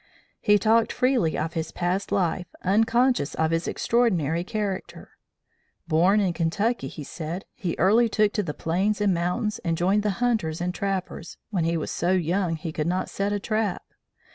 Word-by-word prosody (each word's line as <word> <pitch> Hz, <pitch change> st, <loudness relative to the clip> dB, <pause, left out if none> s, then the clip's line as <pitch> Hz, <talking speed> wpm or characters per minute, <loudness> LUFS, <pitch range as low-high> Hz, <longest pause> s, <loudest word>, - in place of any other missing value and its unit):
"He 210 Hz, 0 st, +4 dB
talked 220 Hz, +2 st, +3 dB
freely 250 Hz, -11 st, +1 dB
of 160 Hz, +2 st, -2 dB
his 160 Hz, -1 st, -3 dB
past 180 Hz, +3 st, -2 dB
life, 180 Hz, -1 st, 0 dB, 0.2 s
unconscious 225 Hz, -, +2 dB
of 160 Hz, 0 st, +1 dB
its 165 Hz, +1 st, 0 dB
extraordinary 175 Hz, -, +1 dB
character. 200 Hz, -1 st, -4 dB, 0.8 s
Born 175 Hz, +6 st, +4 dB
in 190 Hz, -4 st, +1 dB
Kentucky, 175 Hz, -, 0 dB
he 150 Hz, -, -8 dB
said, 165 Hz, +5 st, -6 dB
he 175 Hz, -3 st, -3 dB
early 225 Hz, +6 st, +4 dB
took 210 Hz, -1 st, +2 dB
to 210 Hz, -, +1 dB
the 160 Hz, -7 st, -5 dB
plains 195 Hz, +6 st, 0 dB
and 205 Hz, -2 st, +2 dB
mountains, 180 Hz, +6 st, -1 dB
and 165 Hz, -1 st, -1 dB
joined 190 Hz, +5 st, +2 dB
the 210 Hz, -, 0 dB
hunters 220 Hz, -10 st, 0 dB
and 180 Hz, +1 st, -2 dB
trappers, 190 Hz, -3 st, -4 dB
when 180 Hz, -6 st, 0 dB
he 165 Hz, 0 st, +1 dB
was 155 Hz, -, -3 dB
so 175 Hz, +2 st, 0 dB
young 180 Hz, 0 st, 0 dB
he 160 Hz, +1 st, -5 dB
could 155 Hz, 0 st, -2 dB
not 185 Hz, +2 st, -1 dB
set 200 Hz, +1 st, -1 dB
a 205 Hz, -, 0 dB
trap. 215 Hz, -2 st, -1 dB
185 Hz, 175 wpm, -25 LUFS, 165-210 Hz, 0.8 s, He